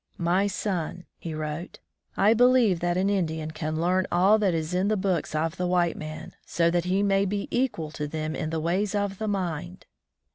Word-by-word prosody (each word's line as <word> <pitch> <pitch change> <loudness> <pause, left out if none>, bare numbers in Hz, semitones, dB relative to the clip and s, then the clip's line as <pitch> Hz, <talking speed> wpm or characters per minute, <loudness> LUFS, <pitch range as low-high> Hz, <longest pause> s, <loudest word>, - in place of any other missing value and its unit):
"My 180 +4 +2
son," 180 -3 -3
he 165 -2 -5
wrote, 155 +2 -5 0.4
"I 205 +3 +5
believe 240 -6 +4
that 175 +1 0
an 190 +1 +2
Indian 160 -6 -1
can 155 0 -3
learn 185 +2 +1
all 195 +5 +4
that 195 -5 +2
is 160 +1 -2
in 185 +2 +1
the 215 0 +1
books 185 -5 -1
of 160 +1 -1
the 180 - -1
white 175 -1 +2
man, 155 0 -7
so 170 0 +1
that 175 0 0
he 190 +2 +1
may 195 -1 +3
be 200 +1 -2
equal 220 -12 -1
to 150 -1 -4
them 155 +1 -3
in 155 - -3
the 160 0 -2
ways 190 +6 0
of 200 -2 -1
the 220 - -2
mind!" 180 -3 -3
180 Hz, 205 wpm, -26 LUFS, 160-200 Hz, 0.4 s, I